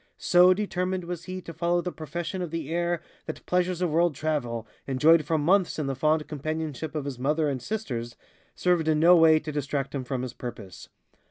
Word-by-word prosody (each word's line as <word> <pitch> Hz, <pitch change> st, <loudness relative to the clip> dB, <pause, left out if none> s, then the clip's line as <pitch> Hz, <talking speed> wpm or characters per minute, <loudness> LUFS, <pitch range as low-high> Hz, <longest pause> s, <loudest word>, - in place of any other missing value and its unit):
So 180 Hz, +1 st, +5 dB
determined 185 Hz, -2 st, -2 dB
was 170 Hz, -1 st, -6 dB
he 185 Hz, 0 st, -5 dB
to 170 Hz, -, -9 dB
follow 175 Hz, +1 st, +1 dB
the 180 Hz, -, -4 dB
profession 170 Hz, +4 st, -5 dB
of 175 Hz, -, -3 dB
the 160 Hz, -2 st, -4 dB
air 175 Hz, 0 st, -1 dB, 0.2 s
that -, -, -7 dB
pleasures 180 Hz, 0 st, 0 dB
of 175 Hz, -, 0 dB
world 170 Hz, -1 st, +2 dB
travel, 125 Hz, -7 st, -2 dB, 0.2 s
enjoyed 150 Hz, +5 st, +4 dB
for 160 Hz, +1 st, +1 dB
months 180 Hz, +5 st, +2 dB
in 155 Hz, -, -2 dB
the 135 Hz, -, -1 dB
fond 155 Hz, +3 st, +1 dB
companionship 155 Hz, 0 st, -4 dB
of 150 Hz, -2 st, -2 dB
his 135 Hz, -3 st, -5 dB
mother 150 Hz, +4 st, +1 dB
and 135 Hz, -3 st, -2 dB
sisters, 120 Hz, -, -4 dB, 0.4 s
served 175 Hz, -3 st, +1 dB
in 155 Hz, -1 st, +3 dB
no 175 Hz, +3 st, +7 dB
way 160 Hz, -2 st, +6 dB
to 155 Hz, 0 st, -4 dB
distract 140 Hz, -1 st, -3 dB
him 135 Hz, -2 st, -3 dB
from 125 Hz, 0 st, -3 dB
his 125 Hz, -2 st, -5 dB
purpose. 105 Hz, -7 st, -9 dB
155 Hz, 200 wpm, -27 LUFS, 140-175 Hz, 0.4 s, no